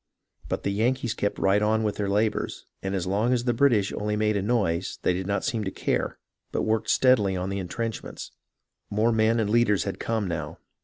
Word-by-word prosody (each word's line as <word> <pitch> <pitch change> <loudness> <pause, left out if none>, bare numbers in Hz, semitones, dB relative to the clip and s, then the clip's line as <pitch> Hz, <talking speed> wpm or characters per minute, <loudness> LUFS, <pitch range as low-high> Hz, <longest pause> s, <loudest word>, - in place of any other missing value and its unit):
But - - -2
the 100 - 0
Yankees 120 +3 0
kept 100 - -2
right 100 +2 +3
on 110 +1 +2
with 105 -1 -1
their 100 -1 -1
labours, 105 +2 0 0.2
and 95 0 -2
as 95 -2 -1
long 105 +7 +1
as 120 -1 +1
the 120 -1 +1
British 115 -6 +3
only 105 0 -1
made 105 0 +1
a 100 - +1
noise 95 -5 0
they - - +3
did 90 +1 -3
not 100 -1 -1
seem 110 -2 -1
to - - -1
care, - - -2 0.3
but - - -1
worked 110 0 0
steadily 110 -7 +4
on 90 +1 -2
the 100 0 -2
intrenchments. 110 +5 -5 0.6
More 110 +3 +2
men 110 +1 +3
and 110 - +1
leaders 115 -4 +3
had 100 - -4
come 110 -3 -1
now. 80 -2 -4
105 Hz, 210 wpm, -26 LUFS, 95-115 Hz, 0.6 s, steadily